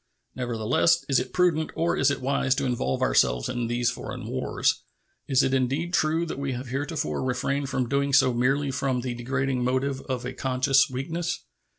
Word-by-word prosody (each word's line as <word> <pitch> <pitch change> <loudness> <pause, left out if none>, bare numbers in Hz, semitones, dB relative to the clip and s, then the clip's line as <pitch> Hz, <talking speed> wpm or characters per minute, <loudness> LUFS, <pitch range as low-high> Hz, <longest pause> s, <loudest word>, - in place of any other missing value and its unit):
Nevertheless, 120 +4 +1
is 135 - +4
it - - -4
prudent 170 -3 +2
or 170 +1 +1
is 140 - +3
it 140 - -2
wise 135 0 +1
to - - -1
involve 120 - -1
ourselves - - +2
in 120 -2 -2
these 120 +1 +1
foreign - - -7
wars? - - 0 0.5
Is 135 0 +3
it 135 - +1
indeed 135 +7 0
true 165 -1 +2
that 160 - -5
we 140 -1 -2
have 125 +1 -6
heretofore 145 +4 -2
refrained 135 +2 -1
from 130 -3 -1
doing 140 +2 0
so 130 -2 +5
merely 135 +4 +1
from 130 -1 -1
the 125 0 -3
degrading 130 +1 -1
motive 130 +2 0
of 125 -2 -2
a 125 - -4
conscious 135 +2 +2
weakness? 165 +7 -3
130 Hz, 185 wpm, -26 LUFS, 125-140 Hz, 0.5 s, so